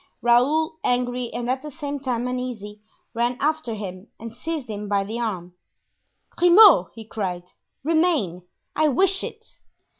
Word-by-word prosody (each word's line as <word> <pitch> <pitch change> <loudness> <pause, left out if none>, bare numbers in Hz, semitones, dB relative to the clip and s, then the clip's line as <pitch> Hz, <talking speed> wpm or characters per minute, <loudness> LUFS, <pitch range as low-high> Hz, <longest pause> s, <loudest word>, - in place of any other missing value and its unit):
Raoul, 300 +7 +3
angry 245 -1 -1
and 240 - -4
at 260 +1 -1
the 300 - -7
same 285 -1 -5
time 250 -3 -2
uneasy, 240 -5 -5 0.3
ran 240 +1 0
after 295 -5 -1
him 190 -1 -7
and 230 0 -8
seized 300 +2 -4
him 210 -1 -6
by 200 -1 +1
the 220 +4 -5
arm. 185 -7 -4 0.8
"Grimaud!" 355 - +7
he 225 -1 -9
cried; 185 -5 -4 0.4
"remain; 315 - +1 0.3
I 310 0 +3
wish 380 +7 +2
it." - - -10
245 Hz, 145 wpm, -23 LUFS, 215-300 Hz, 0.8 s, Grimaud